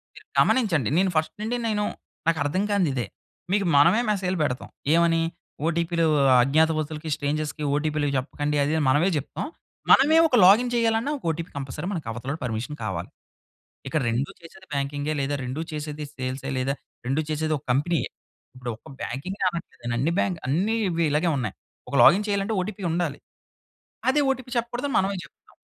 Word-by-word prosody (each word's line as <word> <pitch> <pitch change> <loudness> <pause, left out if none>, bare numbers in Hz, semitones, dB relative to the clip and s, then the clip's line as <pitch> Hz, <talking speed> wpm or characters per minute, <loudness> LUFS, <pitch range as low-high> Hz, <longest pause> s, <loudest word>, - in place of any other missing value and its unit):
మీరు - - -14
గమనించండి. 175 - +3
నేను 190 +1 +3
ఫస్ట్ 155 0 0
నుండి 230 +3 -1
నేను 210 -2 0 0.4
నాకర్థం 160 +3 +1
కానిది 190 -7 +2
ఇదే. 125 -3 -1 0.5
మీకు 200 0 +2
మనమే 170 +10 +6
మెసేజ్‌లు 190 -3 0
పెడతాం. 125 -4 -2 0.2
ఏమని? 165 0 +4 0.5
ఓటీపీలు 170 0 +1 0.4
అజ్ఞాతవసులకి, 155 +3 +1
స్ట్రేంజర్స్‌కి 150 +1 -2
ఓటీపీలు 150 0 0
జెప్పకండి 145 +3 -1
అది 145 +2 0
అని 155 - +1
మనమే 150 +8 +4
జెప్తాం. 145 -1 -3 0.5
మనమే 300 +4 +7
ఒక 275 - +1
లాగిన్ 230 +6 +6
చేయాలన్నా 230 +3 +1
ఒక - - -17
ఓటీపీ 165 +2 -3
కంపల్సరీ 135 +5 -5
మనకు 160 - -4
అవతలోడు 130 +6 -5
పర్మిషన్ 120 +4 -3
కావాలి. 90 -5 -3 0.8
ఇక్కడ 150 +3 0
2 120 +5 -1
చేసేది 190 +3 -14
బ్యాంకింగే 145 +2 -1
లేదా 140 +1 -1
2 130 +5 -3
చేసేది 150 0 -5
సేల్సె 130 +1 -4
లేదా 130 +2 0 0.3
2 135 +5 +1
చేసేది 155 0 0
ఒక 140 - -14
కంపెనీయే. 155 +6 +1 0.5
ఇప్పుడు 125 -1 -6
ఒక్క - - -18
బ్యాంకింగె 180 - -4
అనట్లేదు. 170 -7 -8
అన్ని 140 +7 +1
బ్యాంక్ 180 -3 0
అన్నీ 185 - +1
ఇవి 170 -1 0
ఇలాగే 155 +4 +2
ఉన్నాయి. 120 -7 -2 0.4
ఒక - - -3
లాగిన్ 200 +4 +7
చేయాలంటే, 200 +1 0
ఓటీపీ 200 +1 -5
ఉండాలి. 165 -3 -1 0.9
అదే 295 +3 +4
ఓటీపీ 260 -2 -3
చెప్పకూడదు 240 +3 -1
అని - - -4
మనమే 195 +1 +1
జెప్తాం. - - -18
160 Hz, 160 wpm, -25 LUFS, 140-190 Hz, 0.9 s, మనమే